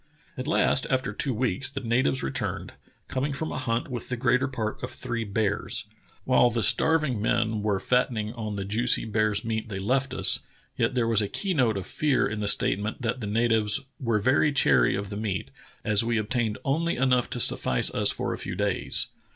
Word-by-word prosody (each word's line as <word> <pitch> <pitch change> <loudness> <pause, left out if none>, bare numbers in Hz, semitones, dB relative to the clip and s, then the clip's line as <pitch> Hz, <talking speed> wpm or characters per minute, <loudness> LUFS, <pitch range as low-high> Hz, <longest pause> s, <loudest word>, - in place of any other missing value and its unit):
At 130 +2 -5
last, 155 -4 +2
after 130 -6 0
two 135 +6 -2
weeks, 120 0 0
the 140 -1 -5
natives 130 +2 +1
returned, 65 - -3 0.3
com 130 - -2
ing 145 - -2
from 160 +3 -4
a - - -3
hunt 115 +1 -1
with 125 -3 -6
the 125 - -2
greater 125 +3 +2
part 115 -5 -4
of - - -4
three 120 -2 -4
bears. 105 0 -1 0.4
While 125 -1 +4
the 115 -1 -1
starving 155 -9 +2
men 110 0 0
"were 100 -2 0
fattening 115 -3 0
on 110 -3 -5
the 100 -1 -4
juicy 115 +5 +1
bear's 110 -1 0
meat 110 0 -3
thej^ 95 -2 -4
left 130 +6 0
us," - - +4 0.4
yet - - 0
there 120 -2 +1
was 115 -2 +3
a 105 - -1
key 195 - -2
note 120 - +2
of 95 - -4
fear 150 +3 +1
in 110 0 -4
the 105 - -2
statement 105 +4 0
that 120 +2 -2
the 105 - -4
natives 110 0 +2 0.2
"were 115 -4 +1
very 130 +7 +3
chary 70 - +3
of 100 0 -4
the 100 - -4
meat, 95 -10 -3 0.3
as 105 0 +3
we 115 0 0
obtained 110 0 -1
only 165 +5 0
enough 125 -1 +2
to 120 - -4
suffice - - +2
us - - +3
for - - -1
a - - -6
few 95 - -5
days." 100 0 +1
115 Hz, 205 wpm, -26 LUFS, 105-130 Hz, 0.4 s, While